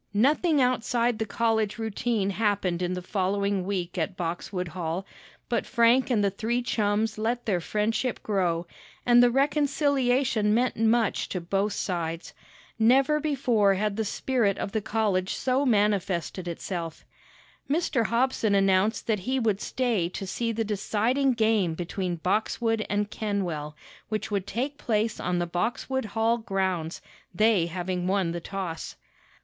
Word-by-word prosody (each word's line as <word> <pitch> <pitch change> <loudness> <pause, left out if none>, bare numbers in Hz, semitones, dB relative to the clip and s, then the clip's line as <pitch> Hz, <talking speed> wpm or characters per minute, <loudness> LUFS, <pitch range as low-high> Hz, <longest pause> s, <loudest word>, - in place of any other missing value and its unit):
Nothing 295 - +3
outside 245 -2 +1
the 220 - -1
college 220 0 0
routine 220 -2 -1
happened 195 -4 0
in 180 0 -1
the 180 0 -4
following 200 0 0
week 185 -2 -2
at 180 +3 -2
Boxwood 175 +1 -3
Hall; 170 +2 -3 0.4
but 235 -2 -1
Frank 240 +2 +4
and 220 -5 +2
the 200 - +2
three 235 +5 -1
chums 215 -1 0
let 235 +2 -1
their 185 -5 0
friendship 215 +6 -1
grow, 175 -5 0 0.4
and 240 0 +6
the 245 - +6
reconciliation 270 -5 +2
meant 245 +2 +1
much 225 0 +1
to 185 - -2
both 195 +4 -1
sides. 170 -3 -3 0.5
Never 270 +6 +4
before 245 -9 +2
had 210 +1 -1
the 220 - 0
spirit 215 -1 0
of 195 - -3
the 220 - -1
college 205 -4 0
so 265 +2 +1
manifested 200 -5 0
itself. 170 -1 -5 0.6
Mr. 275 -7 +1
Hobson 235 -3 +1
announced 195 +2 +2
that 215 -3 +1
he 260 +8 -1
would 215 -4 0
stay 230 -9 0
to 195 +2 -6
see 230 +5 -2
the 225 0 -1
deciding 225 +6 +1
game 220 -7 +2
between 180 +1 -3
Boxwood 220 +5 0
and 205 0 -1
Kenwell, 175 -8 -3 0.3
which 215 0 -3
would 200 -1 -1
take 275 +5 -3
place 220 -1 0
on 180 0 -1
the 175 - 0
Boxwood 230 +9 -2
Hall 225 +2 +1
grounds, 190 -6 -2 0.3
they 215 -3 +3
having 180 +1 -3
won 190 -3 +1
the 170 0 -4
toss. 185 -3 -5
210 Hz, 145 wpm, -27 LUFS, 185-235 Hz, 0.6 s, and